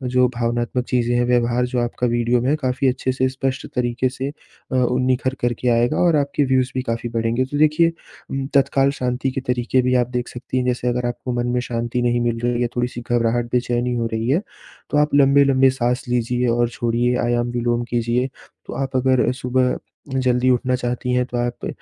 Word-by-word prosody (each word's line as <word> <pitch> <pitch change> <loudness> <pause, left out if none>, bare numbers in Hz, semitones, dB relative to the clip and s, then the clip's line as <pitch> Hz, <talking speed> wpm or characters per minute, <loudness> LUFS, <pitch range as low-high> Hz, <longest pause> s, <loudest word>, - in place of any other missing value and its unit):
जो 125 0 +5
भावनात्मक 120 +1 -1
चीज़ें 120 -1 +1
हैं 120 0 +2
व्यवहार 120 0 +2
जो 125 0 -2
आपका 120 +1 -1
वीडियो 120 0 +1
में 125 - 0
है 150 - +3
काफ़ी 130 0 0
अच्छे 130 0 0
से 130 0 +1
स्पष्ट 130 0 -3
तरीके 125 0 0
से 135 +1 -4 0.4
अ, - - -1
उ 125 0 +2
निखर 130 0 +1
करके 120 +1 -1
आएगा 120 +1 +2
और 170 -3 +4
आपके 145 0 +1
व्यूज़ 130 -1 +1
भी 130 - 0
काफ़ी 115 -1 -3
बढ़ेंगे। 115 +2 0
तो 145 +3 -4
देखिए 155 +3 +4 0.4
उम, 135 0 -2
तत्काल 135 0 +3
शांति 130 -1 -2
के 135 +1 -3
तरीके 125 0 +1
भी 125 0 +1
आप 120 -1 +2
देख 125 -1 -3
सकती 125 +1 -5
हैं 125 - 0
जैसे 125 0 -1
अगर 125 0 0
आपको 120 +1 -4
मन 120 0 -1
में - - +2
शांति 120 0 -2
नहीं 120 0 +1
मिल 120 -1 0
रही 120 0 0
है 120 - +2
थोड़ी-सी 120 0 -2
घबराहट 120 0 +1
बेचैनी 125 0 0
हो 115 -1 -1
रही 110 +2 -1
है, 155 +8 +2 0.5
तो - - +1
आप 150 0 +2
लंबे-लंबे 140 -1 +5
साँस 125 -1 -1
लीजिए 125 +1 0
और 120 0 +2
छोड़िए 120 +1 0
आयाम 120 0 0
विलोम 120 0 0
कीजिए 120 +2 0 0.4
तो - - -7
आप 135 -1 -3
अगर 130 -1 +3
सुबह 125 0 0 0.4
जल्दी 125 0 +2
उठना 125 0 +2
चाहती 125 0 -2
हैं 125 0 +2
तो 125 -1 -5
आप 120 0 -2
125 Hz, 205 wpm, -21 LUFS, 120-130 Hz, 0.5 s, जो